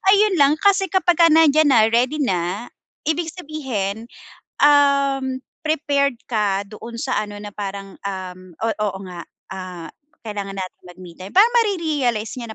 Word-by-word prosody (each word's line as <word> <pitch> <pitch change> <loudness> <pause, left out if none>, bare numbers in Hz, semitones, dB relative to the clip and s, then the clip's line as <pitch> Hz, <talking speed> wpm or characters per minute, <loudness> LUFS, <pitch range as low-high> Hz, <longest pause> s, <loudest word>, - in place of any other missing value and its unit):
ayun 405 -5 +3
lang 285 +2 +5
kasi 390 -1 +4
kapagka 350 -2 +4
nandiyan 310 -1 +5
na, 225 -4 +4
ready 260 +6 +1
na, 185 +2 -2 0.3
ibig 320 +1 -1
sabihin, 240 - -4 0.5
um, 280 -2 +3 0.2
prepared 280 -5 0
ka 200 -3 0
doon 230 +2 -9
sa 260 -3 -2
ano 205 -1 -3
na 205 - -7
parang, 200 -1 -7
um, 185 -2 -6
oh, 225 0 -1 0.2
oo 190 - -7
nga, 175 -1 -8 0.2
ah, 180 -3 -7 0.3
kailangan 205 -3 -5
natin 185 -1 -7
mag-me 180 -1 -13
time. 185 +2 -10
Parang 420 +5 +6
mare-realize 305 - 0
niya 235 - -6
240 Hz, 145 wpm, -21 LUFS, 200-305 Hz, 0.5 s, Parang